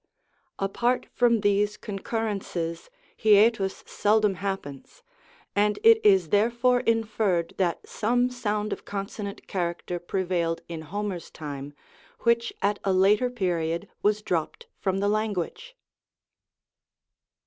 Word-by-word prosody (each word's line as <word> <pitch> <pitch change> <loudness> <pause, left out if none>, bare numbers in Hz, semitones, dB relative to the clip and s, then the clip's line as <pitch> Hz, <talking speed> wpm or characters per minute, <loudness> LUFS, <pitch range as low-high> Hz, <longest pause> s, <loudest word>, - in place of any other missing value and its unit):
Apart 235 +6 0
from 235 -3 +3
these 205 0 +2
concurrelices, 195 -5 -4 0.3
hiatus 210 -2 +4
seldom 210 -1 +2
happens, 190 - -6 0.5
and 210 +1 +2
it 455 0 +7
is 190 -5 +5
therefore 235 +5 +3
inferred 215 -7 0
that 175 -3 -1
some 245 +3 +1
sound 210 -3 -2
of - - -8
consonant 200 0 -6
character 175 -1 -3
prevailed 175 -2 -1
in 165 -2 -6
Ho 195 +7 -4
mer's 185 -5 -4
time, 145 -2 -7 0.5
which 235 0 +2
at 205 +1 +1
a 195 - +1
later 205 +6 +4
period 175 -5 -1
was 210 0 +1
dropped 175 - -2
from 190 -1 0
the 200 - +2
language. 215 - -2
205 Hz, 115 wpm, -26 LUFS, 180-220 Hz, 0.5 s, it